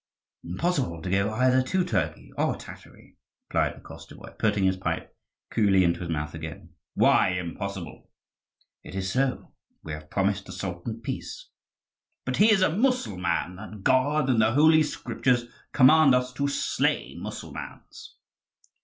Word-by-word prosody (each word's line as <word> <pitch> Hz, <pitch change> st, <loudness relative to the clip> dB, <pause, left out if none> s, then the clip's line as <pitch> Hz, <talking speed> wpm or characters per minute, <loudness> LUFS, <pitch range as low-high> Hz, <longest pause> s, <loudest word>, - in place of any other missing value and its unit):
"Impossible 125 Hz, -, -1 dB
to 90 Hz, -, -3 dB
go 100 Hz, +2 st, +1 dB
either 130 Hz, +3 st, +3 dB
to 180 Hz, +7 st, 0 dB
Turkey 180 Hz, -, -2 dB
or -, -, 0 dB
Tatary," -, -, -14 dB, 0.3 s
replied -, -, +1 dB
the -, -, -15 dB
Koschevoi, -, -, -12 dB
putting 105 Hz, -2 st, +1 dB
his 95 Hz, 0 st, +3 dB
pipe 95 Hz, -, -4 dB, 0.4 s
coolly 100 Hz, -4 st, +4 dB
into 85 Hz, -1 st, +1 dB
his 85 Hz, -, -5 dB
mouth 75 Hz, -2 st, -3 dB
again. 80 Hz, +2 st, -8 dB, 0.2 s
"Why 90 Hz, -, +4 dB
impossible?" 90 Hz, +1 st, -6 dB, 0.7 s
"It -, -, -10 dB
is 95 Hz, 0 st, -2 dB
so; 135 Hz, +2 st, -1 dB, 0.3 s
we 80 Hz, -, -7 dB
have 75 Hz, 0 st, -8 dB
promised 100 Hz, 0 st, 0 dB
the -, -, -8 dB
Sultan 95 Hz, +5 st, -5 dB
peace." 320 Hz, -, -6 dB, 0.8 s
"But -, -, -2 dB
he 215 Hz, -, +6 dB
is 195 Hz, -3 st, +4 dB
a 165 Hz, -, +2 dB
Mussulman; 95 Hz, -, 0 dB
and 105 Hz, -1 st, -10 dB
God 135 Hz, +3 st, +2 dB
and 120 Hz, -4 st, +3 dB
the 110 Hz, +1 st, +3 dB
Holy 155 Hz, +3 st, +6 dB
Scriptures 125 Hz, -4 st, 0 dB, 0.3 s
command 140 Hz, 0 st, +6 dB
us 125 Hz, 0 st, -1 dB
to 140 Hz, +2 st, -1 dB
slay 140 Hz, -, -1 dB
Mussulmans." -, -, -9 dB
110 Hz, 145 wpm, -26 LUFS, 90-135 Hz, 0.8 s, he